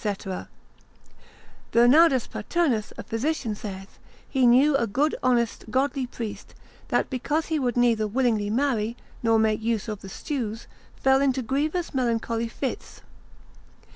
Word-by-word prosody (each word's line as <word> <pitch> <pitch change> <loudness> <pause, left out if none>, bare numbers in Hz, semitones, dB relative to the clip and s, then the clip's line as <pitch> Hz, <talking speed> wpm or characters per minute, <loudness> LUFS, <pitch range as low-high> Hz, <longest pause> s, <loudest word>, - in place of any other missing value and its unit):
Bernardus 260 +3 +5
Paternus, 235 -3 -1
a - - -6
physician, 240 0 -2
saith, 195 -2 -8 0.3
He 260 -3 +2
knew 270 +5 +5
a 235 -4 +1
good 280 +9 +1
honest 240 -3 +1
godly 265 +1 0
priest, 230 -3 -7 0.3
that - - 0
because 295 +5 -1
he 315 -2 +1
would 245 -3 -1
neither 230 -3 +3
willingly 220 -3 +1
marry, 235 -2 0 0.2
nor 225 -1 +3
make 220 0 +2
use 225 -1 -1
of 210 -2 -5
the 195 - -9
stews, 230 -2 -4 0.3
fell 265 0 +3
into 265 -2 +1
grievous 305 +8 -1
melancholy 230 -2 0
fits. 255 +3 -6
245 Hz, 130 wpm, -25 LUFS, 225-275 Hz, 0.3 s, Bernardus